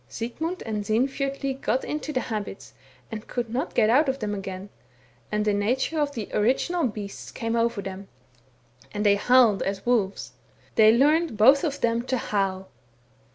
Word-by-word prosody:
Sigmund 320 Hz, +11 st, -4 dB
and 215 Hz, -2 st, -3 dB
Sinfjotli 270 Hz, +5 st, -1 dB
got 260 Hz, -, 0 dB
into 305 Hz, 0 st, -4 dB
the 255 Hz, -3 st, -1 dB
habits, 210 Hz, -4 st, -6 dB, 0.4 s
and 215 Hz, 0 st, -7 dB
could 240 Hz, -2 st, -3 dB
not 265 Hz, +7 st, -2 dB
get 215 Hz, -, +4 dB
out 270 Hz, +6 st, +4 dB
of 265 Hz, -, -1 dB
them 210 Hz, -4 st, -3 dB
again, 195 Hz, 0 st, -6 dB, 0.6 s
and 210 Hz, 0 st, 0 dB
the 210 Hz, -, +2 dB
nature 250 Hz, +10 st, 0 dB
of 285 Hz, -1 st, -1 dB
the 220 Hz, -4 st, -4 dB
original 265 Hz, +9 st, +1 dB
beasts 205 Hz, -3 st, -7 dB
came 230 Hz, 0 st, -3 dB
over 230 Hz, -3 st, 0 dB
them, 195 Hz, 0 st, -7 dB, 0.8 s
and 210 Hz, 0 st, -3 dB
they 205 Hz, -, +6 dB
howled 235 Hz, -1 st, +4 dB
as 195 Hz, 0 st, -3 dB
wolves 220 Hz, -6 st, 0 dB, 0.2 s
— -, -, -32 dB
they 220 Hz, 0 st, +7 dB
learned 295 Hz, +2 st, +3 dB
both 265 Hz, +6 st, +6 dB
of 295 Hz, -4 st, -2 dB
them 230 Hz, 0 st, +1 dB
to 255 Hz, +1 st, -2 dB
howl. 195 Hz, -4 st, -2 dB
230 Hz, 170 wpm, -25 LUFS, 205-265 Hz, 0.8 s, they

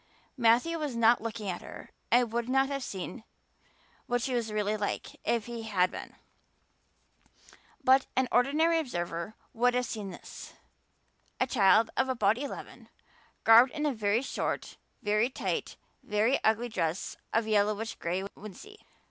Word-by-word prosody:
Matthew 250 Hz, +7 st, +3 dB
was 295 Hz, -5 st, -3 dB
not 230 Hz, +1 st, +4 dB
looking 225 Hz, -2 st, -5 dB
at 180 Hz, -2 st, -3 dB
her -, -, -11 dB, 0.2 s
and 240 Hz, -1 st, +3 dB
would 235 Hz, +1 st, -1 dB
not 270 Hz, +1 st, +3 dB
have 275 Hz, -1 st, -3 dB
seen 205 Hz, +1 st, -6 dB, 0.8 s
what 245 Hz, 0 st, +1 dB
she 260 Hz, +2 st, -2 dB
was 235 Hz, -3 st, -1 dB
really 210 Hz, 0 st, 0 dB
like 205 Hz, -1 st, -3 dB
if 230 Hz, -2 st, 0 dB
he 235 Hz, -1 st, -6 dB
had 195 Hz, -5 st, +1 dB
been, -, -, -8 dB, 1.7 s
but 260 Hz, +1 st, +5 dB
an 260 Hz, 0 st, +2 dB
ordinary 310 Hz, +7 st, +3 dB
observer 175 Hz, -, -4 dB, 0.2 s
would 245 Hz, +2 st, +2 dB
have 250 Hz, 0 st, +1 dB
seen 210 Hz, -4 st, -5 dB
this: 175 Hz, -, -10 dB, 0.9 s
A -, -, +3 dB
child 225 Hz, -2 st, +4 dB
of 265 Hz, -, +1 dB
about 225 Hz, -3 st, +2 dB
eleven, 285 Hz, 0 st, -8 dB, 0.5 s
garbed 235 Hz, +3 st, +7 dB
in 305 Hz, -1 st, -2 dB
a 290 Hz, -, +1 dB
very 215 Hz, +1 st, +1 dB
short, -, -, -3 dB, 0.3 s
very 210 Hz, +3 st, +2 dB
tight, -, -, -3 dB, 0.2 s
very 215 Hz, +6 st, +1 dB
ugly 225 Hz, +2 st, +2 dB
dress 170 Hz, -5 st, -2 dB, 0.2 s
of 225 Hz, 0 st, +1 dB
yellowish 215 Hz, +1 st, +1 dB
gray 180 Hz, +3 st, -3 dB
wincey. 310 Hz, -, -11 dB
230 Hz, 150 wpm, -29 LUFS, 210-255 Hz, 1.7 s, garbed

